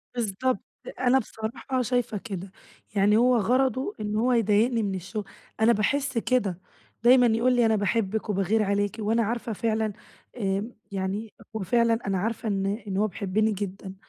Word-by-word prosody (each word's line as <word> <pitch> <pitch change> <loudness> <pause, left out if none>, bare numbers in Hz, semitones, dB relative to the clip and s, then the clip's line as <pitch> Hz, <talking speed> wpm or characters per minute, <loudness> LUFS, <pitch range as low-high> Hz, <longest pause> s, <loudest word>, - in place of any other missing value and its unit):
بالضبط، 235 +1 0 0.4
أنا 260 +1 +4
بصراحة 235 +3 -4
شايفة 245 -3 0
كده، 195 -3 -6 0.4
يعني 205 +2 +4
هو 245 +1 +4
غرضه 260 - +1
إن 210 0 -3
هو 245 +4 +2
يضايقني 225 +1 +3
من 195 -2 -1
الشغل، 190 +3 -5 0.4
أنا 225 - +6
باحس 270 +4 0
كده، 220 -7 0 0.4
دايمًا 250 +1 +7
يقول 235 +3 +3
لي 240 - +4
أنا 220 -1 +3
باحبِك 215 +1 -1
وباغير 205 +2 +1
عليكِ، 200 +1 0
وأنا 225 +2 +1
عارفة 230 +1 -2
فعلًا 220 0 -1 0.4
آآ، 200 +2 -1 0.2
يعني 200 +2 -3 0.2
هو - - -1
فعلًا 235 +2 +2
أنا 195 -1 +1
عارفة 225 +4 -2
إن 195 -2 0 0.2
إن 190 - -2
هو 210 +2 +2
بيحبني 215 +2 0
جدًا، 195 -1 -5
220 Hz, 160 wpm, -26 LUFS, 200-235 Hz, 0.4 s, دايمًا